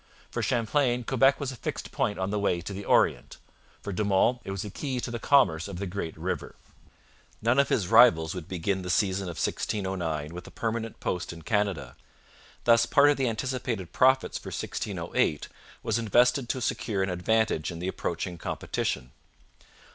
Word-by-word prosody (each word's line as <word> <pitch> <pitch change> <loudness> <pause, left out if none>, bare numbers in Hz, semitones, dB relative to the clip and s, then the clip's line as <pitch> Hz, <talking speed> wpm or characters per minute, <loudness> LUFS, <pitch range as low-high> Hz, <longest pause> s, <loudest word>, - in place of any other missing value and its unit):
For - - -2
Champlain 120 +1 +1
Quebec 135 +3 +3
was 140 -3 -3
a - - -8
fixed - - -5
point 105 - -1
on 95 +1 -2
the 105 - 0
way 90 -3 +1
to 90 +4 -6
the 100 +1 -6
Orient. - - +2 0.5
For 100 - -4
De 105 - -1
Monts 105 +5 +2
it - - -8
was 95 +1 -3
a 105 - -6
key 130 +1 -3
to 120 - -4
the 120 - -4
commerce 115 - +3
of 100 -3 -6
the 100 - -3
great 90 -3 -5
river. - - -4 0.8
None 120 +4 +2
of 140 - +3
his 95 - +1
rivals 100 -9 +6
would 90 -4 -7
begin 95 +2 -1
the 90 - -6
season 95 +1 +1
of 85 -3 -6
1609 85 -7 -2
with 90 0 -8
a - - -9
permanent 115 0 -3
post 90 - -3
in 85 -1 -10
Canada. 100 - -1 0.7
Thus 115 0 +5
part 145 0 +6
of 145 - 0
the 130 -3 +1
anticipated 115 -6 -3
profits 130 +1 +3
for - - -12
1608 75 - -2 0.4
was 110 +1 0
invested 120 +3 +3
to 130 - -1
secure 100 -4 -1
an 95 - -1
advantage 90 -1 +1
in 85 - -6
the 90 +2 -4
approaching 90 -1 -3
competition. 65 -5 -3
105 Hz, 185 wpm, -27 LUFS, 90-120 Hz, 0.8 s, rivals